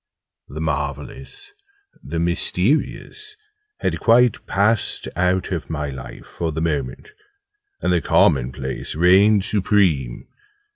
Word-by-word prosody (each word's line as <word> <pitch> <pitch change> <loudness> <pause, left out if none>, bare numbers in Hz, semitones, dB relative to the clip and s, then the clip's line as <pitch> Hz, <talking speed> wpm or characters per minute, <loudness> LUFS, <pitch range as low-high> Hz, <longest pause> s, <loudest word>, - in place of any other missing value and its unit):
The - - -7
Marvellous 405 0 -5 0.5
the 85 - -5
Mysterious 105 - -1 0.5
had - - -1
quite 120 0 +3
passed 105 +2 0
out 90 +2 0
of 85 -4 -4
my 75 -2 -3
life 65 -2 -9
for 85 -1 -4
the 80 - -4
moment: 75 -6 -3 0.7
and - - +1
the 85 - +2
Common 65 -4 +3
place 65 +2 -5
reigned 95 +5 +4
supreme. 90 - +1
90 Hz, 110 wpm, -21 LUFS, 75-105 Hz, 0.7 s, reigned